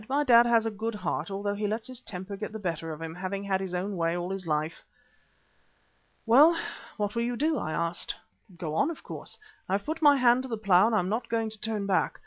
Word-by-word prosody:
"My 285 +2 +2
dad 240 -3 +7
has 230 -1 +4
a 225 - 0
good 220 +2 -3
heart, 185 0 -2
although 200 +1 -2
he 205 +1 -2
lets 220 +2 -3
his 255 -1 -7
temper 190 -1 -6
get 210 +2 -5
the 220 - -5
better 165 -5 -3
of 155 - -7
him, 160 0 -5
having 190 +3 -4
had 195 -1 0
his 185 -2 -3
own 195 +3 -2
way 165 0 0
all 175 +1 -3
his 195 -2 -4
life." 155 +1 -1 1.4
"Well, 295 +9 +7 0.4
what 205 -1 -1
will 235 - 0
you 240 +1 -1
do?" 310 +3 +1
I 155 - -3
asked. 170 +2 -2 0.4
"Go 160 -2 -4
on, 165 - +2
of 335 - -7
course. - - -6 0.3
I've 195 +2 0
put 315 +2 -3
my 290 -2 +7
hand 245 -1 +5
to 260 - -7
the 225 - -2
plough 200 -1 +5
and 230 - +1
I - - +4
am 185 -2 0
not 225 +4 -2
going 225 -1 0
to 215 - -13
turn 215 -2 -2
back. 190 -4 +1
205 Hz, 245 wpm, -28 LUFS, 185-235 Hz, 1.4 s, dad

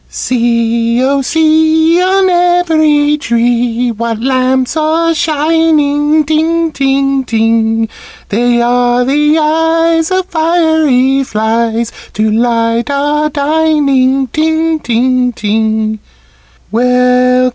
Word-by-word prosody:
"See, 235 -1 -1
oh, 275 +1 +1
see! 320 +3 +2
On 380 +1 +2
every 320 -5 +1
tree 240 0 -1
What 230 0 -4
lamps 255 +1 0
are 320 +2 0
shining, 310 -1 +1
ting, 320 +2 0
ting, 275 -1 0
ting! 225 -1 0 0.4
They 240 +2 +1
are 245 0 +1
eyes 320 +3 +1
of 370 0 -1
fiery 315 -6 +1
flies 225 0 -2 0.2
To 215 0 -1
light 230 +1 0
our 295 +2 -1
dining, 280 -3 +1
ting, 320 +4 -1
ting, 250 0 0
ting! 220 0 -2
275 Hz, 90 wpm, -11 LUFS, 235-315 Hz, 0.4 s, see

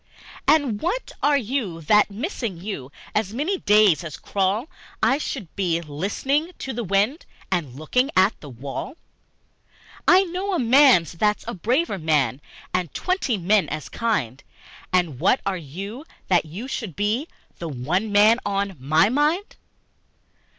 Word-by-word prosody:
And 275 -9 +3
what 425 +9 -2
are 290 0 +4
you 230 -8 -2
that, 210 +8 +4
missing 230 - -4
you, 170 -8 -6 0.2
As 210 0 -1
many 345 +9 -1
days 205 -5 +4
as 155 -5 -7
crawl 200 +6 -1 0.4
I 270 - +3
should 235 - -5
be 175 -4 0
listening 205 - -2
to 265 - -5
the 240 +1 -3
wind 205 - 0 0.2
And 155 -9 -1
looking 250 - 0
at 190 +3 +5
the 145 - -9
wall? 135 - -6 1.1
I 375 +2 +7
know 375 +2 -2
a - - 0
man 255 - +6
that's 210 +5 0
a - - -3
braver 235 - 0
man 145 -5 +1 0.3
And 180 -3 -1
twenty 365 - 0
men 195 +2 +2
as 155 -1 -5
kind, 145 - -2 0.5
And 175 -8 +1
what 255 - +3
are 195 - 0
you, 195 - -7 0.2
that 175 -3 +3
you 195 +11 -7
should 220 - -5
be 215 +9 0 0.3
The 170 - -4
one 165 - -1
man 215 +3 +5
on 200 -2 -2
my 155 +8 +3
mind? 300 - 0
205 Hz, 150 wpm, -23 LUFS, 170-265 Hz, 1.1 s, I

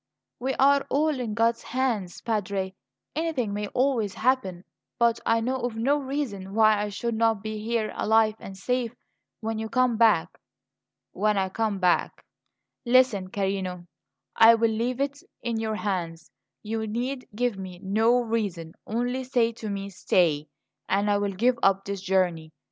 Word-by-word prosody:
"We 265 +2 -1
are 280 +1 +4
all 300 0 +1
in 225 -4 -3
God's 230 0 +2
hands, 230 -8 -2
Padre; 200 -4 -2 0.4
anything 300 -10 -1
may 205 0 -2
always 245 -5 0
happen. 220 -8 0 0.3
But 235 -1 +3
I 225 0 +3
know 255 +3 -1
of 245 -2 -3
no 270 +6 +2
reason 255 -9 -4
why 215 -2 +5
I 210 - -2
should 235 +3 -3
not 225 -2 +1
be 215 0 -4
here 220 0 -1
alive 220 0 +3
and 195 0 -9
safe 245 +3 -1 0.5
when 220 0 -2
you 220 0 -4
come 255 -2 +2
back." 210 -7 +3 0.7
"When 210 0 +1
I 190 -1 +1
come 215 +1 -1
back 180 -2 +1 0.6
Listen, 240 -6 +3
carino; 190 -3 -2 0.5
I 225 +1 +8
will 230 0 +2
leave 240 +3 -1
it 280 +1 -2 0.2
in 235 -2 -1
your 220 -1 -2
hands. 175 -6 -3 0.3
You 220 +1 -3
need 250 +4 -3
give 240 -3 -1
me 185 -2 -7
no 225 +5 +3
reason; 200 -8 -3
only 245 +3 -1
say 245 -3 +1
to 225 -2 -7
me, 200 0 -4
'Stay,' 165 -5 +1 0.4
and 200 +2 +2
I 205 - +2
will 200 -1 -1
give 240 +5 +2
up 195 0 +3
this 200 -1 -4
journey. 180 -5 0
220 Hz, 160 wpm, -26 LUFS, 195-245 Hz, 0.7 s, I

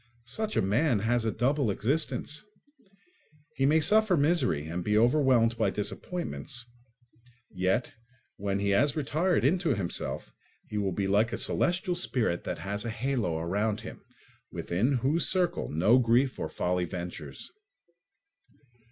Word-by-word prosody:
Such 215 - -3
a - - +3
man 120 +6 +2
has 115 +1 +1
a 110 - +1
double 135 +1 +1
existence: 150 - -1 1.1
he 135 - +2
may 155 +3 +4
suffer 210 +3 +4
misery 145 - +1
and 85 +2 -4
be 105 +2 +1
overwhelmed 120 -1 +4
by - - +3
disappointments, 135 - -4 0.9
yet 95 +6 0 0.4
when 100 0 -2
he 100 0 0
has 140 +9 +3
retired 160 +2 +1
into 170 -2 +2
himself, 95 -4 -3 0.4
he 105 - -3
will 100 -2 0
be 100 +2 -2
like 105 +4 +2
a 115 - -2
celestial 180 +1 0
spirit 125 - -1
that - - -3
has 100 +1 -4
a 115 - -3
halo 115 -7 -1
around 100 +6 -1
him, - - -9 0.5
within 105 +11 0
whose 135 +7 +1
circle 180 -2 0
no 100 +11 +4
grief 125 +2 +2
or - - -3
folly 90 0 -1
ventures. 85 -5 -7
120 Hz, 140 wpm, -28 LUFS, 100-150 Hz, 1.1 s, may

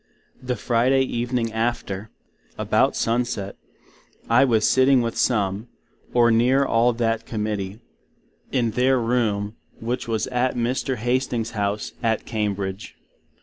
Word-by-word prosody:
The 125 -1 -2
Friday 125 +4 +2
evening 120 -2 -2
after, 110 -3 -2 0.5
about - - +2
sun 115 +2 +1
set, 100 -5 -5 0.7
I 115 +3 +5
was 110 -4 +3
sitting 130 0 +4
with 115 -1 -3
some, 105 -1 0 0.4
or 120 -1 +4
near 125 +5 +3
all 120 0 +3
that 115 -1 -1
Committee, 105 -1 -3 0.7
in 120 -4 +1
their 130 +3 +2
room, 115 -3 0 0.2
which 120 +2 -3
was 110 -2 0
at 125 0 0
Mr. 125 +2 -1
Hastings's 120 -1 -1
House 105 -1 -2
at 115 -2 0
Cambridge. 100 -2 -3
115 Hz, 125 wpm, -23 LUFS, 110-125 Hz, 0.7 s, I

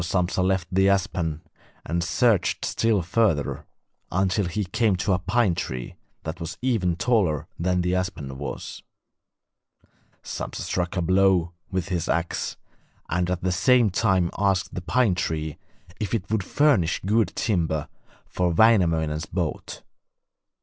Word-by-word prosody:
So 85 +3 -1
Sampsa 90 +1 0
left 95 -1 +1
the 95 +1 +4
aspen 90 -5 0 0.4
and 85 +2 -1
searched 110 +1 +2
still 110 -5 +1
further, 85 -5 0 0.4
until 95 +2 +1
he 105 +5 -2
came 105 +2 +1
to 95 +2 0
a 90 - +1
pine 100 +2 +2
tree 65 -6 -4 0.3
that 80 +2 -5
was 85 -2 -6
even 105 -9 +1
taller 85 - +1
than 90 +1 +1
the 90 +1 0
aspen 85 -8 -3
was. 70 - -6 1.4
Sampsa - - -5
struck 90 0 -2
a 90 - +1
blow 95 -1 +3 0.2
with 95 -2 -2
his 90 -3 -2
axe, 85 +1 -1 0.5
and 90 0 0
at 90 -1 -2
the 95 - +1
same 120 +4 +4
time 95 -3 +2
asked 95 -3 +1
the 90 - -4
pine 115 +2 +2
tree 80 -3 -3 0.4
if 105 +2 -1
it 100 -2 -4
would 110 -3 +1
furnish 105 - +2
good 110 +1 +3
timber 80 -8 0 0.4
for 90 -1 -1
Wainamoinen's 80 -7 +3
boat. 85 -3 -4
90 Hz, 145 wpm, -25 LUFS, 85-100 Hz, 1.4 s, the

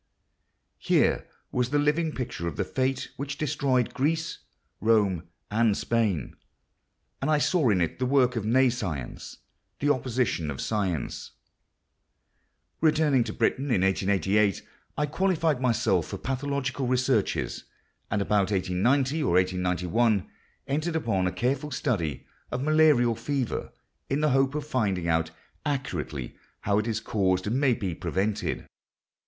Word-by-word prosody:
Here - - +2 0.2
was 125 -1 0
the 145 - +1
living 150 +3 +2
picture 120 - -4
of 85 - -4
the 100 - 0
fate 130 +6 -1
which 140 +1 -4
destroyed 140 -5 0
Greece, 160 +4 -1 0.4
Rome, 100 -6 +2 0.2
and 110 -1 +3
Spain; 105 - 0 0.9
and 135 - 0
I 155 - +4
saw 150 -2 +2
in 100 -4 +3
it 85 - -1
the 130 - +1
work 125 -2 +3
of 115 - -1
nescience—the 115 - -2
opposite 125 - 0
of 65 -2 -5
science.... 100 -7 -2 1.5
Returning 155 -5 +3
to - - -4
Britain 135 - +1
in 120 -10 +1
1888, 95 +1 +2 0.3
I 150 - +2
qualified 160 -3 +1
myself 125 -3 +2
for - - -5
pathological 135 0 -2
researches, 125 -4 0 0.4
and 100 - 0
about 100 -1 +2
1890 120 - +1
or 135 - +1
1891 90 +4 +1 0.4
entered 155 +4 -1
upon 105 -12 +1
a - - 0
careful 135 +7 -1
study 100 - -2 0.2
of 125 +2 -3
malarial 150 -6 +4
fever, 125 +2 -3 0.4
in 140 +2 0
the 150 - +3
hope 135 +2 +2
of 150 - -2
finding 100 - 0
out 80 0 +1 0.3
accurately 85 - -3 0.3
how 100 +1 +2
it 105 - -2
is 110 -2 -1
caused 95 -4 0
and 115 +6 0
may 130 -4 +4
be 95 -7 -3
prevented. 95 +5 -2
120 Hz, 135 wpm, -27 LUFS, 95-140 Hz, 1.5 s, I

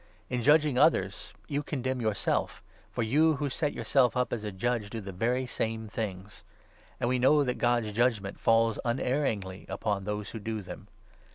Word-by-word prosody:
In 125 -1 0
judging 145 0 +4
others 100 - +2 0.2
you 145 0 -1
condemn 130 -3 -3
yourself, 110 -3 -1 0.3
for 120 - -1
you 155 +8 +3
who 140 -1 -2
set 150 +2 0
yourself 130 -3 +2
up 125 - 0
as 110 - -3
a 105 - -3
judge 105 +2 -1
do 115 - -5
the 100 -2 -7
very 120 +7 0
same 110 -2 -3
things. 105 -1 -6 0.6
And - - 0
we 125 +1 +1
know 145 +4 +5
that 125 -2 0
2 - - -12
God's 120 -3 +1
judgement 110 -3 0
falls 115 -1 +3
unerringly 120 -6 -1
upon 100 -2 -2
those 105 -1 -4
who 115 - -6
do 110 0 -4
them. - - -9
115 Hz, 180 wpm, -29 LUFS, 105-130 Hz, 0.6 s, know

